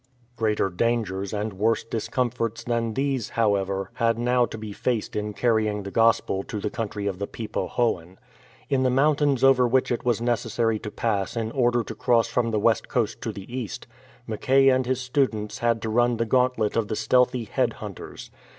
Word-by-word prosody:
Greater 105 -4 0
dangers 100 -2 -1
and 105 0 -3
worse 110 +4 +1
discomforts 115 0 -2
than 115 -2 -1
these, 135 -5 -1
however, 100 -3 +1
had 115 -1 +1
now 125 0 +2
to - - -7
be 110 -1 -7
faced 115 +1 -2
in 105 0 -2
carrying 110 -2 +1
the 100 - -6
Gospel 115 -4 +2
to 105 +2 -5
the - - -3
country 105 -3 -4
of 95 -2 -2
the 100 - -3
Pe 115 - -7
po - - -3
hoan. 95 -7 -1 0.5
In 135 -1 +1
the 130 - +3
mountains 140 0 +2
over 130 -2 +5
which 130 +2 +2
it 120 - -1
was 120 -3 +1
necessary 115 -2 0
to 105 - -6
pass 105 0 -2
in 110 -1 -2
order 120 -2 +2
to - - -7
cross 120 -3 +2
from 115 0 0
the 110 -2 0
west 110 +1 +2
coast - - -1
to - - -3
the 100 +5 -9
east, 125 0 -5 0.4
Mackay 135 +5 +3
and 130 -1 +2
his 130 0 0
students 125 -5 -1
had 115 -1 +1
to 110 - -2
run 120 +1 +2
the 115 - 0
gauntlet 125 -3 +1
of 115 -2 +1
the 110 - -2
stealthy 125 +1 +2
head 110 - 0
hunters. - - -9
115 Hz, 195 wpm, -25 LUFS, 105-125 Hz, 0.5 s, over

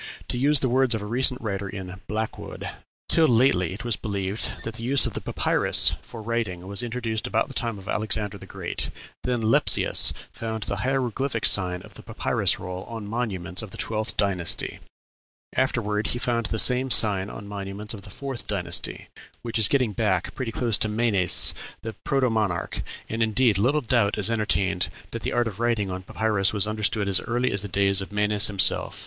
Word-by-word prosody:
To - - -1
use 145 +2 +3
the 130 - +2
words 130 -1 +2
of 105 - -4
a - - -5
recent 125 +3 +2
writer 100 -3 -3
in 95 -1 -8
Blackwood, 110 +1 -4 0.4
"Till 160 -1 +4
lately 115 - +3
it 110 +7 -7
was 120 -3 0
believed 100 0 -2
that 115 - -5
the - - -8
use 130 +3 +5
of - - -3
the - - -3
papyrus - - +3
for 115 -2 -10
writing 105 -6 -2
was 100 +3 -2
introduced 115 -2 -3
about 110 - 0
the - - -8
time 115 -4 -2
of 95 0 -12
Alexander 105 -1 -2
the - - -12
Great; - - -4 0.4
then 125 -2 0
Lepsius 110 +1 +4 0.2
found 110 -1 -4
the 100 - -2
hieroglyphic 130 0 -1
sign 90 -2 +2
of - - -14
the - - -11
papyrus - - 0
roll 90 +1 -6
on 115 -2 -7
monuments 95 -6 -2
of 110 - -8
the - - -11
twelfth 110 -1 -2
dynasty; 95 -4 0 0.8
afterward 105 -5 0
he 120 - -2
found 120 -2 -1
the 110 - -2
same 125 +3 +4
sign 100 -5 +4
on 100 - -9
monuments 100 +1 -5
of 105 - -8
the 100 - -11
fourth 130 0 -6
dynasty, 90 -4 -2 0.4
which 115 -1 -1
is 110 - +7
getting 125 -6 +1
back 95 -5 0
pretty 130 -5 -4
close 115 -2 +1
to 110 - 0
Menes, 105 -5 +4 0.3
the 110 - -5
protomonarch; 110 -9 0 0.3
and, 115 +1 -3
indeed, 110 -1 +3
little 140 +8 +2
doubt 120 -5 +1
is 105 +2 +1
entertained 100 -4 +1 0.2
that - - -5
the - - -2
art 120 -1 +1
of 105 -2 -7
writing 115 -5 0
on 90 0 -4
papyrus 105 +1 0
was 100 -1 +2
understood 105 -1 -1
as 95 -2 +4
early 120 +2 -1
as 100 - +1
the 100 - -4
days 100 0 +2
of 95 - -7
Menes 105 0 +4
himself. 100 -1 +2
110 Hz, 190 wpm, -25 LUFS, 100-120 Hz, 0.8 s, is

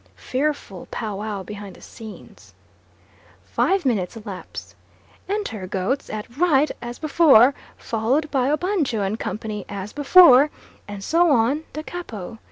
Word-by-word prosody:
Fearful 265 -8 -3
pow 215 -4 -4
wow 205 -2 -4
behind 205 -1 -9
the - - -17
scenes. 220 -2 -13 0.9
Five 385 -4 0
minutes 215 -5 -1
elapse. 205 -4 -9 0.6
Enter 245 - -3
goats 195 +10 -2
at 215 +4 -7
right 305 -3 +3
as 240 0 -6
before, 285 -5 +5 0.2
followed 255 +8 -1
by 265 -1 +1
Obanjo 305 - 0
and 210 +3 -3
company 210 -2 -4
as 200 0 -6
before, 290 -2 +7 0.4
and 205 -1 -7
so 335 - +3
on 275 +4 +2
da 305 - -5
capo. 225 - -7
240 Hz, 130 wpm, -22 LUFS, 210-300 Hz, 0.9 s, before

